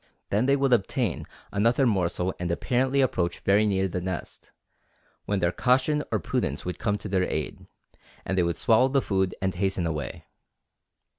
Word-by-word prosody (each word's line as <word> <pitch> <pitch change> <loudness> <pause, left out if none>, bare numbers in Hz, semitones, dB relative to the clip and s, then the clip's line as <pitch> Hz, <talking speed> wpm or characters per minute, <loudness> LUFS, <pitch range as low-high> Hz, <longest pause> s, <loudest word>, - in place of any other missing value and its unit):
Then 110 +6 +2
they 140 - +4
would 135 -2 +2
obtain 100 -5 0 0.2
another 115 +6 +2
morsel 95 -4 0
and 90 0 -2
apparently 130 +9 +1
approach 90 -9 0
very 105 +2 +3
near 95 -1 +1
the 90 0 -3
nest, 90 -1 -6 0.7
when 100 -2 -1
their 85 0 +2
caution 135 +7 +2
or 110 - +2
prudence 70 -6 -2
would 90 - -4
come 105 -2 0
to 105 - -8
their 95 -2 0
aid, - - -4 0.6
and 95 - -1
they 95 - +3
would 85 -2 0
swallow 115 +3 +4
the 135 +1 +2
food 95 -6 0
and 95 0 +1
hasten 95 -1 -1
away. 75 -3 -4
100 Hz, 170 wpm, -26 LUFS, 90-125 Hz, 0.7 s, they